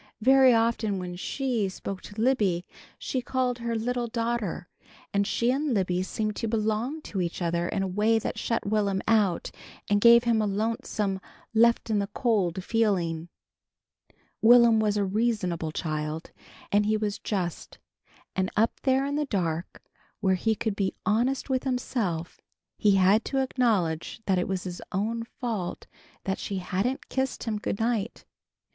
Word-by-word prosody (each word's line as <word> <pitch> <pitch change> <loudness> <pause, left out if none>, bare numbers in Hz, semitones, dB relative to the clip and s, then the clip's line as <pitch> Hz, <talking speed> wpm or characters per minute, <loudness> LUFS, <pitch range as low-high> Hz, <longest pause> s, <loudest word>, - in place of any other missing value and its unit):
Very 265 +2 +6
often 225 -3 +1
when 180 -1 -5
She 235 +1 -1
spoke 190 0 -6
to 205 +1 -10
Libby 210 -8 +2 0.3
she 260 - -2
called 250 -1 -1
her 235 0 -2
"little 240 +2 -1
daughter" 230 -6 -2 0.5
and 200 0 +2
she 235 +3 +1
and 275 -1 0
Libby 180 -2 +1
seemed 215 +3 -2
to 230 - -2
belong 225 +7 -1
to 195 - -3
each 170 -1 -3
other 170 -1 0
in 195 - -1
a - - -1
way 210 +4 +2
that 220 - -3
shut 230 - -1
Will'm 200 -2 0
out 210 -6 +2 0.4
and 205 0 +2
gave 235 +1 +8
him 230 -2 +2
a 210 - +1
lonesome 210 -2 -1 0.3
left 235 0 +3
in 210 - +2
the 200 - -1
cold 200 -5 0
feeling. 180 -7 0 1.1
Will'm 235 -1 +7
was 210 -1 +1
a 200 - +1
reasonable 190 -6 0
child, 155 0 -3 0.4
and 205 +1 +3
he 215 0 +2
was 210 -1 -2
just, 180 -5 -3 0.6
and 190 0 0
up 225 +2 +1
there 265 0 +2
in 285 +1 -1
the 300 - 0
dark 170 - -3 0.4
where 190 -2 +2
he 220 +4 +1
could 215 0 -2
be 195 -2 -1
honest 240 +5 +1
with 260 -2 0
himself, 225 -10 -2 0.3
he 205 -3 +3
had 195 +4 +4
to 270 - -2
acknowledge 225 -11 0
that 190 -2 +2
it 180 - -1
was 190 -1 -2
his 180 -1 -6
own 220 +5 -1
fault 225 -7 -4 0.4
that 190 0 -2
she 200 - -3
hadn't 195 +8 -2
kissed 265 0 -2
him 215 -2 -2
good 205 - -3
night. 225 -1 -1
215 Hz, 165 wpm, -27 LUFS, 190-235 Hz, 1.1 s, gave